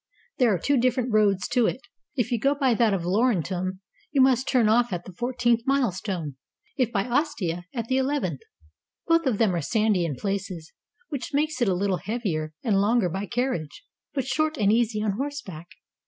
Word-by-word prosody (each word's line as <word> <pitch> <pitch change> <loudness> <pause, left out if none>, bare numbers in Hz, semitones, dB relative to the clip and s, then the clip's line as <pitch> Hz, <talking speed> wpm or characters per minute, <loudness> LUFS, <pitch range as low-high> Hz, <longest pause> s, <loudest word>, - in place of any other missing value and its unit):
There 245 -4 +4
are 190 - +2
two 280 - +1
different 250 -1 +1
roads 205 -3 +3
to 240 -2 +3
it; 260 - -3 0.3
if 245 -3 -1
you 240 - +1
go 275 +5 +2
by 270 -3 +2
that 230 -1 +3
of 185 -4 -1
Lauren 205 0 +2
tum, 185 +3 -4 0.3
you 285 - +1
must 260 0 +4
turn 245 -5 +3
off 235 +2 +3
at 175 -1 -4
the 185 - -10
fourteenth 240 +2 +1
milestone; 190 - -1 0.4
if 250 -4 +1
by 200 -4 0
Ostia, 240 - -1
at 235 -3 -3
the 260 +3 0
eleventh. 275 +2 -1 0.7
Both 330 -2 +3
of 235 -6 +1
them 215 -4 +2
are 170 - -1
sandy 210 +2 +1
in 160 -5 -2
places, 190 -2 -4 0.4
which 290 +1 -4
makes 305 -1 0
it 240 - +3
a - - +2
Httle 190 -1 0
heavier 190 -9 -2
and 205 -6 +2
longer 215 -2 +2
by 195 +4 -4
carriage, 240 - -3 0.3
but 270 -4 -2
short 310 +3 0
and 205 -2 +3
easy 225 -2 +1
on 215 - +1
horseback. 255 - -5
225 Hz, 195 wpm, -25 LUFS, 190-260 Hz, 0.7 s, There